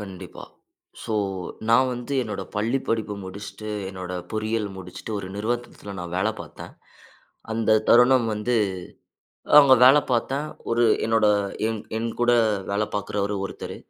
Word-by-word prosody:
கண்டிப்பா, 95 -3 -9 0.6
ஸோ 110 - -3 0.5
நான் 125 +3 +4
வந்து, 125 +3 -5
என்னோட 110 - -5
பள்ளி 115 +6 +1
படிப்பு 110 -2 -1
முடிச்சுட்டு 100 +2 -8 0.2
என்னோட 90 -1 -7 0.2
பொறியியல் 110 0 -1
முடிச்சுட்டு, 95 +4 -8
ஒரு 95 -2 -6
நிறுவனத்தில 110 -2 -4
நான் 90 0 -6
வேலை 110 +4 +1
பாத்தேன். - - -10 0.8
அந்த 110 -1 +3
தருணம் 125 0 +6
வந்து, 105 +4 -1 1.1
அங்க 135 -2 +7
வேல 135 +3 +8
பாத்தேன். 135 +5 0 0.2
ஒரு 120 +1 +3 0.2
என்னோட, 110 -1 +3 0.4
என் 110 -1 -3 0.2
என் 115 +1 -2
கூட 120 0 +4 0.4
வேல 100 +2 +1
பாக்கறவரு 100 0 -2
ஒருத்தரு, - - -7
110 Hz, 130 wpm, -24 LUFS, 100-120 Hz, 1.1 s, வேல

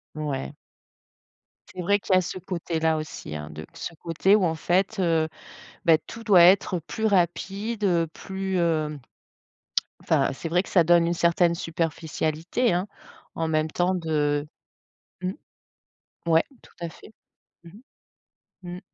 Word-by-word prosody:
Ouais. 145 -3 -3 1.2
C'est 180 - -5
vrai 205 +4 +2
qu'il 190 - +1
y - - +7
a 185 - +4
ce 180 - -5
côté-là 165 -3 -1
aussi, 155 - -6
hein, 75 0 -6
de 75 +1 -8
ce - - -6
côté 170 +5 +2
où 210 - +2
en 165 -2 +1
fait, 190 +6 0
heu, 165 -3 +2 0.6
bah, 165 -2 +7
tout 230 +8 -11
doit 200 -6 +6
être, 185 +1 +5
heu, - - -6
plus 220 +7 -4
rapide, 200 +3 0
heu, 170 -4 +2
plus, 190 +3 -4
hem, 155 -3 0 1.0
enfin - - +2
c'est 150 +5 -5
vrai 175 +2 +2
que - - -13
ça 175 -3 +4
donne 170 0 +5
une 170 - +1
certaine 170 0 +3
superficialité, 165 +5 -1
hein. 180 +3 0 0.5
En 165 -1 -1
même 155 0 +1
temps 180 +3 +1
de 150 -3 0 0.8
mmh, 185 0 -1 1.0
ouais 165 0 +5 0.2
tout - - -20
à 170 - -3
fait. 185 - -15 0.5
Mmh 170 - -12 0.9
mh. 175 - -7
Mmh. - - -8
170 Hz, 155 wpm, -25 LUFS, 160-185 Hz, 1.2 s, y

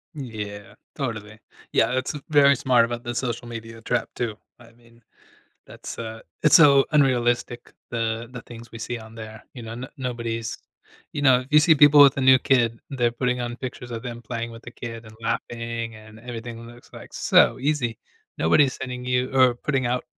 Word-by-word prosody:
Yeah, 105 -6 -7 0.2
totally, 110 -6 -5 0.3
yeah - - +2
that's, 130 +3 -1
uh, 150 - -6
very 140 -2 +6
smart 125 -3 +3
about 120 0 -5
the 120 0 -5
social 120 -2 -3
media 115 -1 -8
trap, 120 +1 -1
too. 110 -3 -3 0.2
I 115 -1 -17
mean, 115 0 -23 0.6
that's, - - -9
uh, 110 -1 -7 0.2
it's 150 - +7
so 140 -4 +7
unrealistic, 120 -4 +1 0.2
the 115 0 -2
the 125 - -8
things 115 -1 -12
we 115 - -8
see 120 +1 -4
on 110 0 -13
there, 110 -1 -10
you 120 - -8
know? 115 0 -7
No 130 +2 -7
nobody's 115 -3 -4 0.5
you 145 - -4
know, 130 -3 +5
if 130 - -11
you 150 - +8
see 160 +1 +5
people 145 0 +7
with 140 -1 +6
a 135 - -1
new 130 0 +6
kid, 120 -4 +1
they're 120 -3 0
putting 125 0 -1
on 120 0 -4
pictures 125 -1 -7
of 115 - -5
them 120 -1 -7
playing 115 0 -5
with 115 +1 -12
the 120 - -10
kid 115 -1 -8
and 110 - -13
laughing 115 0 -3
and 110 0 -14
everything 115 -1 -8
looks 120 +1 -16
like - - -12
so - - +4
easy. 135 -6 -1 0.4
Nobody's 130 - +3
sending 125 -1 -6
you 125 0 0
or 130 -2 +5
putting 130 0 -1
out 125 +1 -1
120 Hz, 195 wpm, -24 LUFS, 115-130 Hz, 0.6 s, you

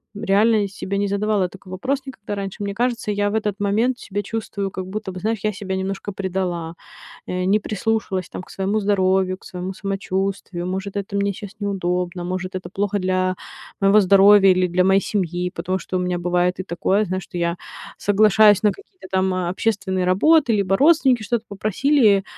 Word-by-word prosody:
Реально 205 +1 +2
себе 195 0 -4
не 200 0 0
задавала 200 -1 0
такой 190 +1 -15
вопрос 260 +9 -1
никогда 255 -6 -7
раньше. 200 0 -5
Мне 200 0 -3
кажется, 235 -1 -1
я 205 0 0
в 205 - -3
этот 210 -2 -1
момент 225 +5 +1
себя 205 +1 -4
чувствую 200 -2 -4
как 185 0 -6
будто 210 0 -5
бы, 185 - -7
знаешь, 220 +3 -1
я 215 0 0
себя 190 -1 -4
немножко 195 +2 -3
предала, 180 -4 -3 0.5
не 185 +3 +1
прислушалась, 215 -3 -2
там, - - -7
к - - -17
своему 195 +3 -1
здоровью, 190 -2 +1
к - - -18
своему 180 +1 -5
самочувствию. 195 -2 -3
Может, 190 +2 -4
это 200 0 -4
мне 200 0 +1
щас 200 0 -9
неудобно, 180 -3 -2
может, 185 +1 -4
это 185 -1 -5
плохо 205 +2 -1
для 185 0 0 0.5
моего 195 +1 +5
здоровья 195 0 +6
или 185 0 +3
для 180 +1 +1
моей 190 +1 +4
семьи. 180 -3 -2
Потому 185 +3 -2
что 185 - -4
у - - 0
меня 180 -1 -1
бывает 180 +1 0
и - - -4
такое, 195 +3 0
знаешь, 185 +1 -3
что 175 - -7
я 170 0 0 0.4
соглашаюсь 210 0 +5
на 210 - +4
какие-то 385 - -15
там 190 0 +1
общественные 185 +1 -1
работы, 245 - +4
либо 195 -2 +2
родственники 275 -4 +4
что-то 230 +1 -2
попросили, 215 0 +2
195 Hz, 180 wpm, -21 LUFS, 185-210 Hz, 0.5 s, здоровья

